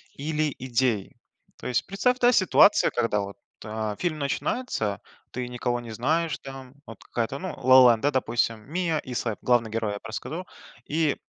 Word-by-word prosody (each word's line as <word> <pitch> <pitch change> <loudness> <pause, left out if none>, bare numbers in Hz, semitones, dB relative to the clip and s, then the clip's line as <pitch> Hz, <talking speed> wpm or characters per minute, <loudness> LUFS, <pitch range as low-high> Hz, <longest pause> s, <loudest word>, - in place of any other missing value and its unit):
или 150 0 -1
идеи. 125 -5 0 0.4
То - - -7
есть 125 -1 0
представь, 250 +6 +1
да, 245 0 +5
ситуация, 205 -1 +5
когда 115 -3 0
вот, 100 0 -7 0.3
а, 110 -1 -3
фильм 155 -4 -2
начинается, 140 - -2 0.3
ты 125 0 -4
никого 120 0 -2
не 115 -2 -9
знаешь 155 +8 0
там, 135 -1 -10
вот 115 - -12
какая-то, 120 +4 -3
ну, 185 -2 -5
"Ла-Ла 130 -1 +8
Ленд", 110 - -4
да, 145 - +3
допустим, 115 -3 0
Миа 170 -3 0
и 130 - -8
Сэб, 115 -3 -2
главный 120 -3 +2
герой, 110 -2 -1
я - - -4
б - - -52
расскажу. 160 +10 -5 0.4
И 155 -1 +1
130 Hz, 175 wpm, -26 LUFS, 115-155 Hz, 0.4 s, Ла-Ла